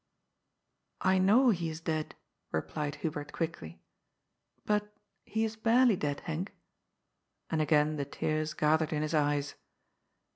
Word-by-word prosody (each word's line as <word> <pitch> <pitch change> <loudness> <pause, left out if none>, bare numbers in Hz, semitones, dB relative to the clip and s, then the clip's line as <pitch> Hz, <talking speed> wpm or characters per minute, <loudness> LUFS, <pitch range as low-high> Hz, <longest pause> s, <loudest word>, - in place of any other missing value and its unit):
" - - -50
I 190 - +4
know 230 +7 +5
he 170 -5 -1
is 160 0 -6
dead," 155 -1 -2 0.4
replied 145 - -2
Hubert 150 -2 -3
quickly. 85 - -5 0.4
" - - -47
But 210 0 0 0.3
he 220 +1 -1
is 220 0 -4
barely 230 +1 +4
dead, 145 -4 -3
Henk." 165 +3 -2 1.0
And 160 - +1
again 155 0 +3
the 140 - -2
tears 155 +2 -2
gathered 155 +1 +2
in 150 0 0
his 155 - -2
eyes. 145 -1 +1
155 Hz, 140 wpm, -31 LUFS, 150-190 Hz, 1.0 s, know